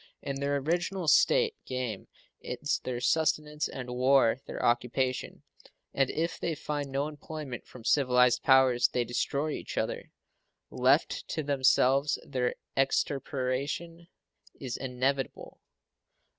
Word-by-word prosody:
In 135 -1 -4
their 140 0 0
original 175 +5 -1
state 460 - +4
game 125 -6 -4 0.3
is 130 +3 -2
their 125 -1 -3
sustenance 150 +2 +1
and 125 -2 -7
war 130 -1 +3
their - - -4
occupation, 125 +2 0 0.5
and 135 -1 +2
if 165 +2 -2
they 165 - -2
find 145 -1 -4
no 140 +2 -1
employment 150 -3 -7
from 125 - -13
civilized 125 -3 +4
powers 130 -2 +5
they 125 -2 -1
destroy 140 +5 -1
each - - -6
other. - - -3 0.6
Left - - +2
to 155 - -3
themselves 140 0 +3
their 125 -3 -1 0.2
extirpation 140 +5 -1 0.5
is 130 -3 -4
inevitable. 130 +1 -3
135 Hz, 115 wpm, -29 LUFS, 125-150 Hz, 0.6 s, powers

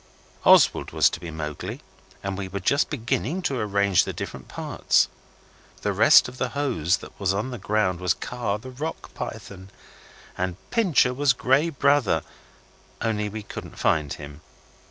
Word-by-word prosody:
Oswald - - +5
was - - +3
to - - -5
be 85 0 -7
Mowgli, 75 -1 -5 0.4
and 100 0 -3
we 95 0 -4
were 95 +1 -4
just 140 - +2
beginning 150 +6 -2
to 135 -6 -1
arrange 100 -3 +2
the - - -4
different - - -7
parts. - - +1 0.8
The - - 0
rest - - +7
of 125 +1 -11
the 130 - 0
hose 95 - +1
that - - -13
was 95 -1 +1
on 110 +6 -2
the 125 - -6
ground 100 -4 0
was 90 -1 +1
Kaa, 120 -5 -3
the 130 +5 -10
Rock 150 +6 -6
Python, 95 -1 -7 0.7
and 90 -1 -2 0.2
Pincher 180 - +3
was 140 0 +3
Grey 135 +6 +2
Brother, 140 - +2 0.8
only 105 -2 -1
we 110 +1 -6
couldn't - - -9
find 75 -3 +1
him. 75 +1 -10
105 Hz, 160 wpm, -25 LUFS, 95-130 Hz, 0.8 s, rest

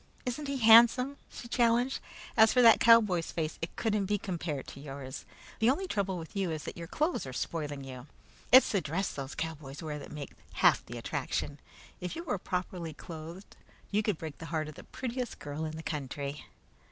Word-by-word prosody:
Isn't 260 +4 -3
he 280 0 -1
handsome?" 240 +4 +7
she 235 - -9
challenged. 240 +2 +2 0.4
"As 220 0 +7
for 250 - +4
that 230 -1 +8
cowboy's 210 -8 +5
face, 160 -2 -3
it 165 - -4
couldn't 210 -4 0
be 205 +1 +1
compared 170 -8 -4
with - - -10
yours. 135 -1 -7 0.3
The 225 +1 +4
only 305 +9 +1
trouble 195 - -1
with 165 +2 -9
you 195 -3 0
is 155 -2 -3
that - - -6
your 170 -1 -7
clothes 305 - -1
are 130 - -6
spoiling 145 -1 -3
you. 130 0 -9 0.4
It's 260 +1 +8
the 200 - +2
dress 175 +6 -2
those 135 -1 -6
cowboys 155 -2 -5
wear 150 -2 -4
that - - -10
makes 145 -2 -8 0.2
half - - +4
their - - -6
attraction. 145 0 -3 0.4
If 180 0 -4
you 335 - -5
were 205 - -2
properly 180 -3 -4
clothed, 165 +4 -9 0.4
you 205 +1 +3
could 210 -5 0
break 155 -3 -7
the 165 - -7
heart 160 -2 -2
of - - -9
the - - -12
prettiest 250 -1 -4
girl 145 +2 -5
in 155 - -4
the 160 - -7
country." 140 -1 -4
175 Hz, 200 wpm, -31 LUFS, 150-225 Hz, 0.4 s, that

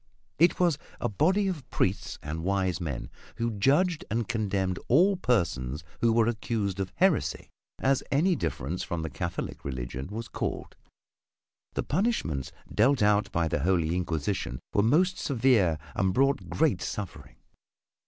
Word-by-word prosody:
It 170 +2 +4
was 170 -5 +3 0.2
a - - 0
body 185 - +2
of 160 -9 -4
Priests 95 -1 -1
and 80 +3 -4
wise 95 -1 0
men 75 -7 -4 0.2
who 115 0 -1
judged 150 - +2
and 115 +1 -1
condemned 100 -5 -1
all 180 +10 +5
persons 85 - 0 0.2
who 115 - +3
were 115 0 +4
accused 110 -4 -1
of 95 -1 -2
heresy, 185 -3 +1 0.3
as 135 0 +2
any 170 +6 +3
difference 85 - -3
from 85 -3 -3
the 80 - -4
Catholic 85 -2 -4
religion 65 0 -4
was 110 +3 -5
called. - - -4 1.0
The - - 0
punishments 145 - -1 0.2
dealt 125 +2 +4
out 105 0 +3
by 85 -1 +1
the 75 - -1
Holy 85 0 +1
Inquisition 85 -5 -2
were 100 - +4
most 180 - +3
severe 115 - +3 0.2
and 95 -1 +1
brought 135 +1 +2
great 155 -3 +1
suffering. 100 -4 -6
105 Hz, 145 wpm, -28 LUFS, 85-140 Hz, 1.0 s, all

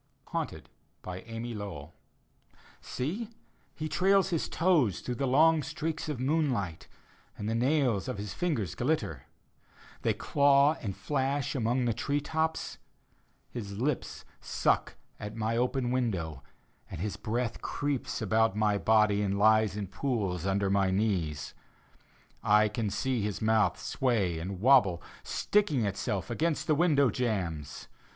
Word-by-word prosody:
HAUNTED: - - -4 0.4
amy 115 +6 -6
lowbll 95 -8 -7 0.9
Seel 185 - -3 0.5
He 155 - -3
trails 195 +3 +3
his 165 - -1
toes 155 - +2
Through 125 - -3
the 135 +3 -1
long 155 +4 +5
streaks 155 +3 -4
of 145 -5 -3
moonlight. 130 - 0 0.5
And 105 - -4
the 110 - 0
nails 125 -3 +1
of 130 -4 -3
his 100 -1 -5
fingers 145 - -1
glitter; - - -2 0.7
They - - +1
claw 140 +1 +4
and 100 -4 -4
flash 140 0 -1
among 125 0 0
the 120 - +1
tree 140 +6 -1
tops. 160 +2 -2 0.7
His 100 -5 -6
lips 135 +2 -2
suck - - 0 0.2
at 105 +1 -6
my 115 0 -1
open 125 +1 0
window, 90 - -1 0.5
And - - -7
his 105 +3 -2
breath 115 +1 -2
creeps 145 -5 -2
about 110 0 +2
my 105 -1 +2
body 105 -2 +3
And 100 -1 0
lies 110 -1 +4
in 105 - -2
pools 95 - -2
under 95 0 +1
my 100 -1 +3
knees. 95 -7 -1 0.9
I 105 +1 +4
can 105 0 -2
see 115 +5 -1
his 105 0 -2
mouth 110 -6 +2
sway 105 -10 0
and 90 +2 -5
wobble, 105 -9 +5 0.2
Sticking 190 - +1
itself 100 +2 -2
against 155 +5 0
the 155 - +3
window 145 -5 +3
jambs. 90 - -3
115 Hz, 135 wpm, -30 LUFS, 100-140 Hz, 0.9 s, long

